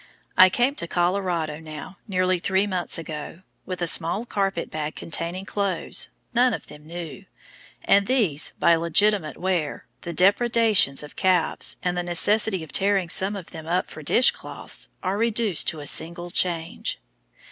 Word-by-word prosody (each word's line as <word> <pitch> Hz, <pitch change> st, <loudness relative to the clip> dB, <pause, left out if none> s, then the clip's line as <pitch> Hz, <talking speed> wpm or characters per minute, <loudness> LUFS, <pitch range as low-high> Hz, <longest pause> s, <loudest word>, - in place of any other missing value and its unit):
I 185 Hz, -, +8 dB
came 245 Hz, +7 st, +1 dB
to 170 Hz, -, -1 dB
Colorado 175 Hz, -4 st, -1 dB
now 160 Hz, +4 st, -10 dB
nearly 185 Hz, -2 st, +1 dB
three 190 Hz, +3 st, +1 dB
months 185 Hz, -4 st, 0 dB
ago, 165 Hz, +2 st, -7 dB, 0.2 s
with 180 Hz, -1 st, -4 dB
a -, -, 0 dB
small 170 Hz, +8 st, +2 dB
carpet 195 Hz, -6 st, -2 dB
bag 155 Hz, 0 st, -4 dB
containing 170 Hz, +3 st, -1 dB
clothes, 195 Hz, -5 st, -1 dB, 0.2 s
none 245 Hz, 0 st, +3 dB
of -, -, -10 dB
them 150 Hz, +1 st, -14 dB
new; 165 Hz, -5 st, -8 dB, 0.6 s
and 200 Hz, 0 st, +3 dB
these, 210 Hz, -, +1 dB
by 170 Hz, -, +4 dB
legitimate 170 Hz, +1 st, +2 dB
wear, 175 Hz, -5 st, -2 dB, 0.2 s
the 170 Hz, -, -6 dB
depredations 205 Hz, -, +3 dB
of 145 Hz, -, -12 dB
calves, 185 Hz, -2 st, +2 dB
and 180 Hz, -1 st, 0 dB
the 175 Hz, -, -1 dB
necessity 190 Hz, +2 st, +2 dB
of 160 Hz, -, -11 dB
tearing 195 Hz, -3 st, +1 dB
some 195 Hz, +3 st, +2 dB
of 190 Hz, -4 st, -9 dB
them 160 Hz, -2 st, -9 dB
up 180 Hz, +2 st, -1 dB
for 155 Hz, -, -9 dB
dish 240 Hz, -, +4 dB
cloths, -, -, -9 dB
are 190 Hz, +2 st, -1 dB
reduced 225 Hz, -5 st, 0 dB
to 160 Hz, -4 st, -2 dB
a -, -, -8 dB
single 170 Hz, +3 st, +1 dB
change! 170 Hz, -2 st, -1 dB
180 Hz, 160 wpm, -24 LUFS, 165-200 Hz, 0.6 s, I